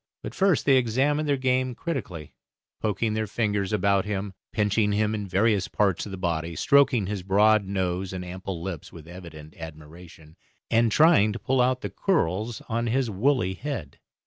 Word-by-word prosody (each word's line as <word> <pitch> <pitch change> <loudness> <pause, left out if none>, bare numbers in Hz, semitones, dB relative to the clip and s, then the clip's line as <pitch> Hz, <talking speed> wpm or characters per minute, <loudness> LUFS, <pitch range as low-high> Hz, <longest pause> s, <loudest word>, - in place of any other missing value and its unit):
But - - -6
first 190 -5 +2
they 135 -2 +5
examined 135 +5 +1
their 140 - +2
game 130 -1 0
critically, 105 - -5 0.5
poking 110 +1 -1
their 110 0 -1
fingers 105 -2 -1
about 100 -2 +2
him, 100 -1 -4 0.2
pinching 105 0 +1
him 105 +1 +1
in 105 -2 -4
various 100 +1 +1
parts 100 -2 0
of - - -8
the 95 - -6
body, 85 -2 -2
stroking 135 - +3
his 100 0 -4
broad 105 +3 +3
nose 95 -1 -2
and 90 -1 -5
ample 90 -1 -6
lips 90 -5 -6
with 80 -2 -12
evident 80 -4 -11
admiration, 80 0 -12 0.3
and 115 0 +3
trying 150 -8 +5
to - - -4
pull 130 +2 0
out 125 +1 +1
the - - -5
curls 110 - -1
on 115 +1 -1
his 125 0 0
woolly 105 -2 +1
head. 115 - -6
105 Hz, 170 wpm, -25 LUFS, 90-120 Hz, 0.5 s, they